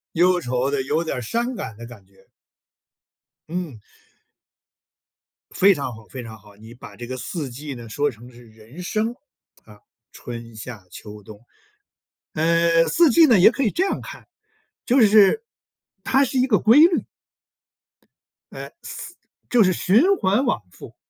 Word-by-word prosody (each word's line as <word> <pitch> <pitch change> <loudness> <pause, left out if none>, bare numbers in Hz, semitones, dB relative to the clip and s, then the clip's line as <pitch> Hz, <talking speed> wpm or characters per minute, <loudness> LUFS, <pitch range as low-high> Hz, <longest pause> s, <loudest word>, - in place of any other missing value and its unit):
忧 180 +1 +3
愁 125 0 -2
的， 140 -2 -1
有 155 +5 -1
点 160 - -4
儿 125 - -4
伤 235 - -2
感 110 - -7
的 115 - -10
感 115 -5 -13
觉。 95 0 -26 1.2
嗯。 170 -9 -5 1.7
非 200 +1 +4
常 135 -7 -5
好 110 0 -15
非 130 +2 -9
常 110 -1 -10
好， 100 0 -19
你 110 +3 -14
把 125 - -13
这 120 - -9
个 130 +1 -6
四 145 +1 -5
季 140 +4 -8
呢 120 -3 -10
说 145 +5 -1
成 120 +1 -15
是 120 0 -17
人 110 +9 -14
生 220 +6 -2 0.5
啊， 105 -1 -17 0.3
春、 115 -1 -10
夏、 110 -3 -10
秋、 105 -1 -11
冬。 105 0 -13 0.9
呃， 165 +1 +2
四 335 -1 +3
季 320 +6 +6
呢， 235 -9 +4
也 180 - +8
可 270 +3 -2
以 215 - +1
这 360 - 0
样 - - -2
看， - - -11 0.6
就 255 +2 +3
是 215 - +5 0.6
它 270 +1 +2
是 265 0 -2
一 255 - +3
个 220 -7 +2
规 225 +8 +4
律。 335 +2 +4 1.5
呃， - - -9
4 - - -9 0.3
就 240 -3 +4
是 185 -1 +2
循 240 - +3
环 205 +7 +1
往 240 - -1
复。 - - -14
155 Hz, 170 characters per minute, -22 LUFS, -, 1.7 s, 也